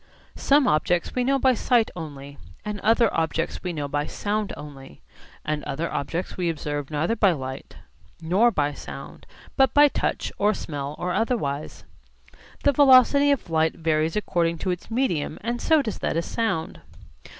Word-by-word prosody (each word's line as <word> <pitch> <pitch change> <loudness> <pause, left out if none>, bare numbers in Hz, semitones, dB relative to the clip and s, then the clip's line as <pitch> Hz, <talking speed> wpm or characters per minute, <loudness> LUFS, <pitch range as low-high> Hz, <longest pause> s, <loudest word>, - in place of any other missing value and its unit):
Some 280 -1 +4
objects 175 +1 +1
we 250 - 0
know 275 +2 +2
by 260 -1 +3
sight 235 -1 +2
only, 145 -4 -8 0.3
and 210 -1 -4
other 225 +2 +3
objects 165 0 -1
we 180 - -3
know 150 -4 -4
by 145 +1 -2
sound 210 0 -2
only, 140 -2 -11 0.4
and 150 -1 -2
other 155 +4 -3
objects 170 +6 -3
we 180 -2 -1
observe 145 -3 -4
neither 155 +8 0
by 200 -5 +3
light 130 -3 -7 0.4
nor 185 +8 +3
by 145 -9 -1
sound - - -10 0.3
but 265 -1 +3
by 290 0 +7
touch - - -2
or 210 +1 +2
smell 145 -1 -5
or 180 0 -2
otherwise. 155 - -2 0.8
The 285 - +5
velocity 280 +1 +6
of 275 -11 0
light 160 0 +2
varies 160 -1 0
according 170 -5 0
to 185 - +1
its 180 - -6
medium 225 - -1
and 240 +2 -3
so 315 -3 +3
does 220 -5 -4
that - - -1
of 165 - -1
sound. 220 - -2
175 Hz, 165 wpm, -24 LUFS, 150-235 Hz, 0.8 s, by